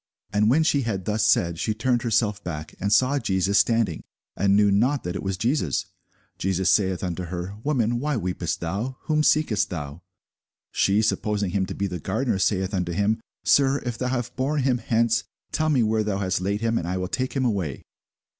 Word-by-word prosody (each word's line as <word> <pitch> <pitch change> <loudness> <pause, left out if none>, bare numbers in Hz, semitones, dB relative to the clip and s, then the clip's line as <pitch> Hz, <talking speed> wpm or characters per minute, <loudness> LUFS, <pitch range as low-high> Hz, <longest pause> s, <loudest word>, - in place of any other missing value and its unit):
And 105 +1 +3
when 155 +6 +4
she 145 -3 +2
had 100 -7 -3
thus 105 0 +1
said, 85 -1 +2
she 110 - -1
turned 120 +2 +1
herself 110 -3 0
back, 80 -3 -6
and 100 +1 -1
saw 130 +5 +4
Jesus 100 -3 +2
standing, 115 -8 +1 0.3
and 100 +1 +3
knew 105 0 +4
not 125 +8 +2
that 90 +1 -4
it - - -3
was 95 -1 -2
Jesus. 115 - 0 0.5
Jesus 95 0 +1
saith 95 -3 +1
unto 90 0 -3
her, 90 +2 -5
Woman, 120 -5 +1
why 145 0 -1
weepest 90 -4 -3
thou? 105 +10 -3
whom 155 -1 +1
seekest 150 -9 +2
thou? 75 -2 -6 0.7
She, 100 +3 +2
supposing 105 -3 0
him 95 0 0
to - - -5
be 100 - -1
the 90 -2 -4
gardener, 110 - -1
saith 95 0 0
unto 90 -2 -1
him, 105 +4 +1 0.2
Sir, 140 0 +4
if 120 -2 -2
thou 125 - -1
have 125 -1 -3
borne 140 +2 0
him 125 -2 +2
hence, 115 0 +1 0.3
tell 155 0 0
me 135 -6 +3
where 110 0 +1
thou 105 -2 -1
hast 95 -2 -1
laid 100 +3 -1
him, 115 0 +1
and 85 - -5
I 90 +1 -1
will 90 0 -2
take 130 +7 -2
him 135 -2 0
away. 95 - -2
105 Hz, 200 wpm, -24 LUFS, 95-120 Hz, 0.7 s, when